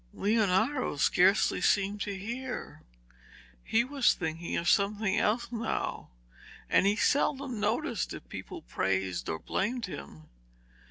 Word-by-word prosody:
Leonardo 220 Hz, -, +1 dB
scarcely 185 Hz, +7 st, +3 dB
seemed 200 Hz, 0 st, +2 dB
to 200 Hz, -1 st, -3 dB
hear; 240 Hz, +7 st, -6 dB, 0.8 s
he 230 Hz, +1 st, +2 dB
was 275 Hz, +1 st, +2 dB
thinking 165 Hz, -1 st, -3 dB
of 170 Hz, -, -2 dB
something 205 Hz, -1 st, +2 dB
else 235 Hz, +4 st, 0 dB
now, 230 Hz, -1 st, -3 dB, 0.6 s
and 195 Hz, -, +4 dB
he 205 Hz, -, +3 dB
seldom 270 Hz, -1 st, +1 dB
noticed 225 Hz, +10 st, -1 dB
if -, -, -8 dB
people 345 Hz, -, -8 dB
praised 95 Hz, -2 st, -1 dB
or 80 Hz, -, -1 dB
blamed 235 Hz, -, -2 dB
him. 80 Hz, -, -9 dB
210 Hz, 120 wpm, -30 LUFS, 185-240 Hz, 0.8 s, and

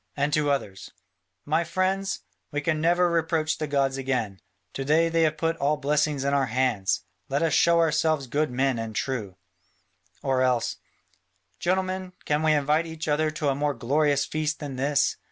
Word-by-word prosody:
And 145 Hz, +1 st, 0 dB
to 150 Hz, -1 st, +2 dB
others, 105 Hz, -9 st, -2 dB, 0.6 s
"My 160 Hz, +3 st, +1 dB
friends, 185 Hz, +3 st, -1 dB, 0.3 s
we 145 Hz, -, -1 dB
can 155 Hz, 0 st, 0 dB
never 175 Hz, +2 st, +3 dB
reproach 160 Hz, -2 st, 0 dB
the 155 Hz, -, -2 dB
gods 135 Hz, -2 st, +1 dB
again: 125 Hz, -8 st, -2 dB, 0.3 s
to 135 Hz, -, -3 dB
day 160 Hz, +4 st, +3 dB
they 165 Hz, 0 st, +1 dB
have 155 Hz, -1 st, +2 dB
put 165 Hz, +1 st, 0 dB
all 150 Hz, +1 st, +1 dB
blessings 145 Hz, -1 st, 0 dB
in 140 Hz, 0 st, 0 dB
our 140 Hz, -2 st, +2 dB
hands. 120 Hz, -5 st, 0 dB, 0.3 s
Let 140 Hz, +4 st, 0 dB
us 160 Hz, -3 st, +1 dB
show 170 Hz, 0 st, +4 dB
ourselves 155 Hz, -2 st, +2 dB
good 150 Hz, +5 st, 0 dB
men 130 Hz, 0 st, 0 dB
and 110 Hz, -1 st, -5 dB
true." 110 Hz, -8 st, -3 dB, 0.9 s
Or 130 Hz, -1 st, +1 dB
else, 125 Hz, -2 st, +1 dB, 0.8 s
"Gentlemen, 185 Hz, 0 st, -1 dB
can 150 Hz, +1 st, +1 dB
we 155 Hz, -1 st, +3 dB
invite 150 Hz, +3 st, +1 dB
each 160 Hz, 0 st, -6 dB
other 155 Hz, +1 st, +2 dB
to 155 Hz, -1 st, -1 dB
a -, -, +2 dB
more 145 Hz, +1 st, -1 dB
glorious 140 Hz, +4 st, +1 dB
feast 155 Hz, 0 st, -2 dB
than 145 Hz, -3 st, -6 dB
this? 140 Hz, +2 st, +1 dB
150 Hz, 175 wpm, -26 LUFS, 135-160 Hz, 0.9 s, show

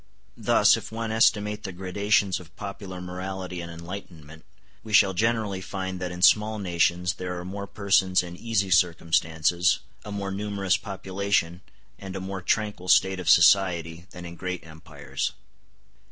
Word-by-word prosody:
Thus, -, -, +4 dB
if -, -, -8 dB
one 115 Hz, 0 st, -4 dB
estimate 105 Hz, -1 st, +2 dB
the 95 Hz, -, -5 dB
gradations 95 Hz, +2 st, 0 dB
of 85 Hz, -1 st, -16 dB
popular 100 Hz, -2 st, -7 dB
morality 90 Hz, 0 st, -5 dB
and 85 Hz, 0 st, -7 dB
enlightenment, 85 Hz, -3 st, -10 dB, 0.4 s
we 110 Hz, -, -8 dB
shall 100 Hz, -1 st, +6 dB
generally 110 Hz, -1 st, 0 dB
find 95 Hz, -1 st, -5 dB
that 90 Hz, -1 st, -4 dB
in 90 Hz, 0 st, -5 dB
small 110 Hz, +3 st, +5 dB
nations 90 Hz, -2 st, +1 dB
there 90 Hz, -1 st, -5 dB
are 90 Hz, -, -6 dB
more 100 Hz, +2 st, -6 dB
persons 100 Hz, -2 st, +2 dB
in 85 Hz, -1 st, -8 dB
easy 100 Hz, -2 st, -1 dB
circumstances, 85 Hz, 0 st, +2 dB, 0.3 s
a 105 Hz, -, -8 dB
more 100 Hz, -1 st, -4 dB
numerous 100 Hz, -1 st, 0 dB
population, 100 Hz, -4 st, -2 dB, 0.4 s
and 95 Hz, -1 st, -8 dB
a -, -, -3 dB
more 95 Hz, 0 st, -5 dB
tranquil 105 Hz, -2 st, -1 dB
state 95 Hz, 0 st, +4 dB
of 90 Hz, -, -2 dB
society, 85 Hz, -1 st, +4 dB
than 90 Hz, -1 st, -10 dB
in 85 Hz, 0 st, -9 dB
great 90 Hz, 0 st, -5 dB
empires. 75 Hz, -4 st, -5 dB
95 Hz, 155 wpm, -26 LUFS, 85-100 Hz, 0.4 s, shall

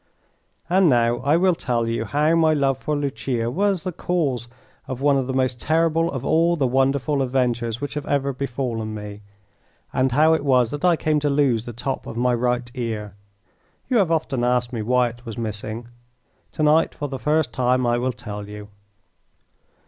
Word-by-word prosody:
And 180 Hz, 0 st, +4 dB
now 120 Hz, -2 st, +3 dB
I 145 Hz, +4 st, +2 dB
will 185 Hz, +1 st, +3 dB
tell 120 Hz, -7 st, -1 dB
you 115 Hz, 0 st, -1 dB
how 150 Hz, +7 st, +1 dB
my 160 Hz, -2 st, +4 dB
love 135 Hz, -2 st, +1 dB
for 150 Hz, -, -2 dB
Lucia 135 Hz, -4 st, -2 dB
was 195 Hz, +1 st, 0 dB
the 185 Hz, -, -2 dB
cause 145 Hz, -9 st, -1 dB, 0.4 s
of 130 Hz, -1 st, -5 dB
one 140 Hz, 0 st, +3 dB
of 135 Hz, -2 st, 0 dB
the -, -, -2 dB
most 130 Hz, -2 st, 0 dB
terrible 165 Hz, +1 st, +2 dB
of 130 Hz, -3 st, -5 dB
all 170 Hz, +2 st, +3 dB
the 145 Hz, -5 st, 0 dB
wonderful 135 Hz, +2 st, +1 dB
adventures 120 Hz, -3 st, 0 dB
which 145 Hz, 0 st, -4 dB
have 150 Hz, -1 st, -5 dB
ever 140 Hz, -1 st, 0 dB
befallen 120 Hz, -4 st, -3 dB
me, 105 Hz, -1 st, -8 dB, 0.7 s
and 130 Hz, 0 st, +1 dB
how 155 Hz, +5 st, +4 dB
it 160 Hz, -, 0 dB
was 125 Hz, -4 st, +3 dB
that 145 Hz, -, -5 dB
I 180 Hz, -2 st, +5 dB
came 155 Hz, -1 st, +1 dB
to 145 Hz, 0 st, 0 dB
lose 135 Hz, -6 st, +1 dB
the -, -, -4 dB
top 130 Hz, +4 st, -4 dB
of 115 Hz, -, -7 dB
my 125 Hz, +1 st, +2 dB
right 120 Hz, 0 st, -1 dB
ear. 110 Hz, -5 st, -4 dB, 0.8 s
You 250 Hz, -, +3 dB
have 195 Hz, -6 st, +3 dB
often 145 Hz, -6 st, 0 dB
asked 125 Hz, 0 st, +1 dB
me 115 Hz, -, -2 dB
why 125 Hz, +2 st, +2 dB
it 120 Hz, +1 st, -14 dB
was 115 Hz, -3 st, -7 dB
missing. 110 Hz, +1 st, -5 dB, 0.7 s
To 155 Hz, -, -2 dB
night 155 Hz, +2 st, +3 dB
for 145 Hz, -, -4 dB
the 135 Hz, -2 st, -6 dB
first 155 Hz, +2 st, +1 dB
time 125 Hz, 0 st, +1 dB
I 120 Hz, 0 st, +2 dB
will 130 Hz, +1 st, 0 dB
tell 105 Hz, -3 st, -8 dB
you. 105 Hz, 0 st, -9 dB
130 Hz, 195 wpm, -22 LUFS, 120-150 Hz, 0.8 s, I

